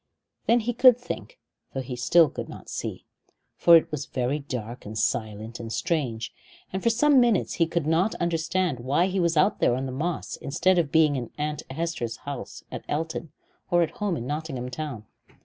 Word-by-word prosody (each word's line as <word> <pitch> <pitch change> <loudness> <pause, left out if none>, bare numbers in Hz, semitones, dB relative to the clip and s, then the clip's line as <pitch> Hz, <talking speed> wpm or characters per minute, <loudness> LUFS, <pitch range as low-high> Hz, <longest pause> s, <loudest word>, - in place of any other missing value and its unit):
Then 235 +1 +5
he 240 +2 -1
could 245 0 +7
think, 485 - -7 0.4
though 135 - -1
he 125 -1 -5
still 160 +7 +5
could - - -6
not - - -10
see, - - -5 0.5
for 170 -1 +8
it 160 - -1
was 150 -3 -4
very 130 +3 -1
dark 125 -4 -6
and 105 +1 -7
silent 110 +1 -2
and 115 -1 -6
strange, 130 -9 -1 0.4
and 190 - -2
for 230 - +3
some 270 +4 +5
minutes 235 -5 +3
he 165 - +5
could 170 -2 -1
not 165 +7 +2
understand 170 -2 0
why 140 +8 +2
he 190 0 -1
was 170 -2 +2
out 195 +6 +3
there 120 - +3
on 130 +1 -2
the 130 - -4
moss 155 +6 -3
instead 180 +6 +2
of 155 -4 0
being 155 -2 +4
in 120 -3 -4
Aunt 150 0 -2
Hester's 135 -6 -3
house 140 -2 -6
at - - -6
Elton, 160 +1 -3 0.4
or 175 -2 +4
at 160 - -2
home 200 -5 -2
in 120 - -5
Nottingham 140 -3 -4
town. 130 -6 -5
155 Hz, 195 wpm, -26 LUFS, 130-175 Hz, 0.5 s, for